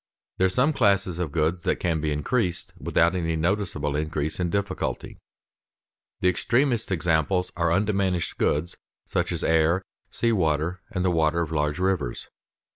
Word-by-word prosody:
There 95 - +5
are - - -1
some 125 +11 +2
classes 100 - +2
of 85 -5 -2
goods 85 +2 0
that - - +1
can 80 -3 -1
be 75 -1 -1
increased 90 - -1
without 85 +2 +2
any 85 -3 -1
noticeable 80 -4 -1
increase 75 +1 -2
in 90 -1 0
difficulty. 100 +1 -3 1.0
The 90 - +3
extremest 120 - +1
examples 90 +2 +1
are 85 -1 +1
undiminished 95 -2 0
goods 80 +4 0 0.3
such - - -1
as - - -3
air, 80 +3 +3 0.3
sea 115 - 0
water, 85 -2 0
the 90 -3 0
water 80 0 +2
of 80 -2 -3
large 75 -1 0
rivers. 90 -9 -1
85 Hz, 150 wpm, -25 LUFS, 80-95 Hz, 1.0 s, There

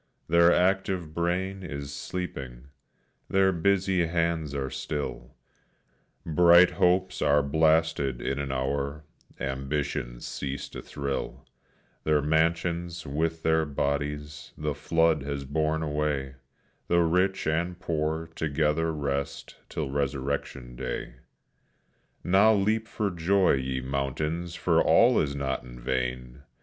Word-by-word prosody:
Their 85 +1 +5
active 90 -3 +1
brain 90 +3 -1
is 70 -5 -6
sleeping, 70 -5 -6 0.6
their 95 0 +4
busy 95 0 +2
hands 85 -3 -1
are 65 -1 -2
still, 75 -1 -5 0.9
Bright 85 +2 +6
hopes 90 +1 +1
are 70 0 +4
blasted 80 -3 +2
in 70 +3 -2
an 70 -1 -3
hour, 70 +3 -2 0.4
ambitions 70 -2 -3
cease 70 0 -4
to - - -8
thrill; 70 -1 -4 0.6
Their 75 -1 +3
mansions, 85 +2 0
with 80 +3 -2
their 80 0 +3
bodies, 75 0 -3
the 75 -1 -2
flood 80 +1 +2
has 70 0 -4
borne 80 +3 0
away 75 -3 -1 0.5
The 85 0 +3
rich 90 +3 +1
and 85 +3 -1
poor 80 -1 -1
together 80 +1 0
rest 70 -2 -3
till 75 -4 -3
resurrection 70 -2 -3
day. 65 +1 -5 1.1
Now 100 +5 +5
leap 110 +3 +1
for 105 -4 -2
joy, 90 +2 +3
ye 65 -1 -1
mountains, 75 +6 -2
for - - +2
all - - +5
is 70 -1 -2
not 65 -2 -2
in - - -11
vain! 60 +1 -3
75 Hz, 115 wpm, -27 LUFS, 70-85 Hz, 1.1 s, Bright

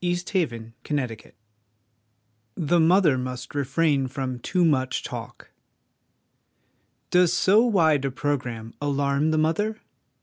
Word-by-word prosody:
THE 175 0 +1
CHILD 175 -3 -1
AND 115 -1 -10 0.2
MOTHER - - -2 0.2
NATURE 110 - -16 1.2
The 170 +1 +1
Mother 165 -3 +4
must 125 0 -6
refrain 140 0 +1
from 130 -1 -4
too 180 +7 +1
much 130 -5 0
Talk. - - -8 1.6
Does 180 -1 +4
so 210 +4 +4
wide 160 - +3
a - - 0
programme 125 -5 -3
alarm 140 +1 0
the 155 - +1
mother? 185 +8 0
145 Hz, 125 wpm, -24 LUFS, 130-175 Hz, 1.6 s, Mother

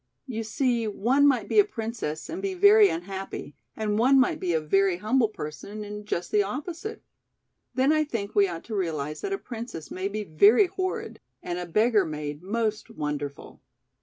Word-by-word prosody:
You 225 -4 -4
see 235 +1 0
one 250 +7 +3
might 250 -7 +2
be - - +3
a - - +9
princess 225 - -5
and 340 +4 -5
be 390 -1 -2
very 405 +2 +7
unhappy 195 - -5 0.2
and 215 -1 -1
one 265 +3 +5
might 255 - +2
be 180 - -1
a 160 - +2
very 190 +4 +2
humble 225 +5 +2
person 205 +4 -7
and 210 0 -8
just 175 -3 -3
the 210 - +4
opposite. 320 - -5 0.7
Then 265 +4 +3
I 310 0 +3
think 220 -8 -4
we 200 -1 +4
ought 170 -2 -6
to 220 - -6
realize 155 -6 -2
that 395 - -3
a 390 - 0
princess 230 - -8
may 185 +1 -2
be 210 +1 -3
very 200 - +5
horrid 370 +1 -4 0.2
and 175 0 -3
a 180 - -5
beggar 215 +4 +3
maid 150 -2 -5
most 215 +3 -2
wonderful." 150 -7 -5
215 Hz, 185 wpm, -26 LUFS, 180-260 Hz, 0.7 s, a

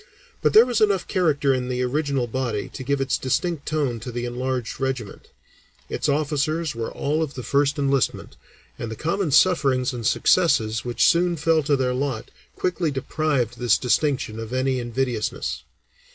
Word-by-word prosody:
But - - +2
there 225 +2 +8
was 240 -3 -1
enough 200 -4 +2
character 145 -6 +2
in 125 -1 -2
the 125 0 -1
original 140 0 0
body 120 -3 -3
to 130 - -8
give 140 +2 0
its 135 -1 0
distinct 155 +4 -1
tone 145 -6 -1
to 125 +3 -7
the 120 0 -3
enlarged 125 -1 -3
regiment; 130 -6 -4 0.6
its - - -1
officers 155 +2 0
were 115 -1 -4
all 150 +3 -1
of 150 -3 -3
the 125 - -6
first 140 +5 +1
enlistment, 135 - 0 0.4
and 115 - -4
the 110 - -5
common 170 - -1
sufferings 135 -6 +3
and 120 -2 -5
successes 110 - +2
which 120 -1 +1
soon 175 +1 +3
fell 160 +1 +2
to 145 0 +1
their 130 -2 0
lot 130 -3 -3 0.2
quickly 175 -2 -1
deprived 135 -3 -1
this 120 -3 +3
distinction 125 -2 0
of 115 +1 -6
any 130 0 0
invidiousness. 120 - -2
135 Hz, 165 wpm, -23 LUFS, 125-155 Hz, 0.6 s, there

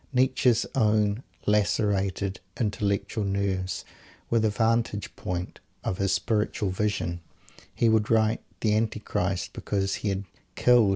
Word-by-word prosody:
Nietzsche's 125 -2 +3
own 105 -2 +2 0.2
lacerated 100 -2 +1 0.2
"intellectual 105 -1 0
nerves" 95 -1 -1 0.5
were 115 - +4
the 110 0 +3
vantage 115 -1 0
ground 90 0 -4 0.2
of 90 - -2
his 100 -1 +2
spiritual 105 -2 0
vision. 90 -4 -1 0.5
He 115 - +3
could 110 -1 +3
write 110 0 +3 0.2
"the 105 -1 +3
Antichrist" 105 -4 -1
because 95 -1 -1
he 105 - 0
had 95 0 -1 0.3
"killed." 120 -4 +5
105 Hz, 120 wpm, -27 LUFS, 100-110 Hz, 0.5 s, killed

